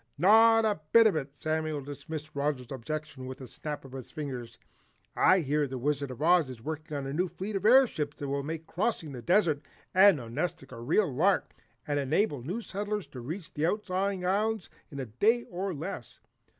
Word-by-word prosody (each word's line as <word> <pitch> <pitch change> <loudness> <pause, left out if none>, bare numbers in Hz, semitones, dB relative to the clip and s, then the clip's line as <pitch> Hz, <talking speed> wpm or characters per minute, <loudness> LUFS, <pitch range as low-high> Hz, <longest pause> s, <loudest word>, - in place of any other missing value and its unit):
"Not 225 +6 +6
a 210 -5 +1
bit 230 0 +8
of 215 - +4
it!" 140 -2 -4
Samuel 155 0 -1
dismissed 150 +2 -7
Roger's 140 -3 -2
objection 135 +1 -5
with 130 +2 -7
a 130 - -8
snap 150 +4 -6
of 135 - -11
his 130 -2 -8
fingers. 125 -6 -6 0.6
"I 185 -1 +5
hear 145 0 +1
the 130 0 -5
Wizard 140 +2 -1
of 130 +3 -6
Oz 170 -4 +4
is 125 -3 -8
working 155 +3 -5
on 140 - -4
a 135 - -4
new 180 +5 +1
fleet 195 +4 -5
of 195 +2 +1
airships, 220 - +4
that 145 - -5
will 140 +1 -1
make 160 +3 -5
crossing 175 -4 -2
the 125 -3 -7
desert 165 - +3 0.3
and 190 -2 +7
Nonestic 135 +3 -4
a 115 -2 -8
real 155 - +2
lark 185 +9 +2 0.3
and 145 -1 0
enable 145 - +1
new 180 - -4
settlers 205 -1 -3
to 130 - -9
reach 160 +7 -6
these 150 - 0
outlying 195 -1 -1
islands 210 +1 0 0.2
in 140 - -7
a 135 - -3
day 215 - +2
or 190 +2 -4
less. 150 - -6
155 Hz, 195 wpm, -29 LUFS, 140-190 Hz, 0.6 s, bit